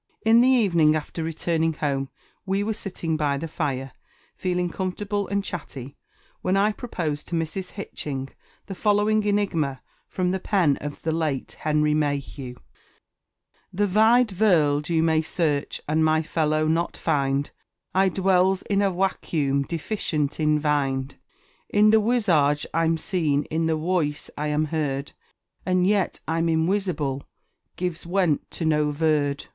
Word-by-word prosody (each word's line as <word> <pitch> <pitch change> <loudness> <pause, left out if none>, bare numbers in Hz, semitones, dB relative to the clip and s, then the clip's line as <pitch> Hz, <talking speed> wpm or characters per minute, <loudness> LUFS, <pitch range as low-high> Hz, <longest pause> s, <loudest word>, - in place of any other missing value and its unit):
In 225 +1 +6
the 250 - +5
evening, 175 -12 +4
after 155 +2 -4
returning 165 0 0
home, 140 -3 -2 0.3
we 195 +1 0
were 220 +1 -1
sitting 180 -6 -3
by 145 -2 0
the 165 +4 -4
fire, 135 -5 -3 0.4
feeling 180 -1 -1
comfortable 200 +2 -3
and 200 0 -1
chatty, 140 -8 -7 0.5
when 185 +1 +1
I 205 +2 +3
proposed 170 - -4
to 175 - -3
Mrs. 165 +3 -3
Hitching 135 -9 -5 0.3
the 195 - -6
following 210 +2 +2
enigma 170 -10 0 0.3
from 180 -1 -1
the 190 - -1
pen 180 -8 +2
of 145 0 -7
the 160 - 0
late 155 -5 -2
Henry 150 0 +1
Mayhew: 140 -4 -2 1.2
The 205 +3 +1
Vide 220 +5 +4
Vorld 160 -7 +2
you 165 -1 +2
may 160 -1 +3
search, 155 -3 -1
and 155 +2 +2
my 155 0 +3
fellow 155 -1 0
not 165 +2 0
find; 140 -3 0 0.4
I 190 +1 +4
dwells 190 0 +2
in 200 -1 +1
a 200 - +3
Wacuum, 155 -7 0
deficient 160 -4 -2
in 150 -1 +3
Vind; 140 -3 -1 0.5
In 210 +1 +5
the 220 - +6
Wisage 170 -11 +2
I'm 165 0 +2
seen 155 -5 0
in 160 +1 0
the 160 -1 +1
Woice 155 -3 -1
I 150 - -2
am 150 +1 +1
heard, 140 -3 -2 0.5
And 185 -1 +2
yet 200 0 +1
I'm 165 +1 0
inwisible, 160 -5 0 0.5
gives 175 -2 -4
went 175 -5 +1
to 165 - -4
no 150 -1 +2
Vurd. 145 -2 0
160 Hz, 145 wpm, -24 LUFS, 150-190 Hz, 1.2 s, In